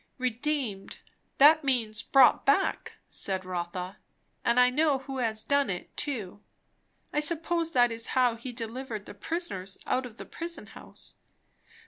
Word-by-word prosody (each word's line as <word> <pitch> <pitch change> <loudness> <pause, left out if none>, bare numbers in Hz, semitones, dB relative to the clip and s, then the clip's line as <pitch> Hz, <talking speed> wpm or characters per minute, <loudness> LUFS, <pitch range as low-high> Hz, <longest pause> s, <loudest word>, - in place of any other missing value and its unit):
Redeemed, 255 -4 -3 0.4
that 310 +3 +7
means, 230 -5 0
bought 265 0 +5
back, 285 +8 +1
said 190 -1 -1
Rotha; 180 +1 -5 0.5
and 235 +1 +3
I 250 0 +5
know 295 +1 +2
who 270 0 -6
has 220 -3 -1
done 280 0 +1
it, 180 -2 -6
too. 215 -9 -4 0.7
I 300 - +2
suppose 330 +2 +2
that 245 -2 +4
is 230 0 -3
how 250 -2 +4
he 235 +2 -7
delivered 230 -2 -5
the - - -10
prisoners 195 - -4
out 255 0 0
of 230 -2 -16
the - - -8
prison 335 0 -5
house. - - -11
250 Hz, 145 wpm, -28 LUFS, 215-285 Hz, 0.7 s, that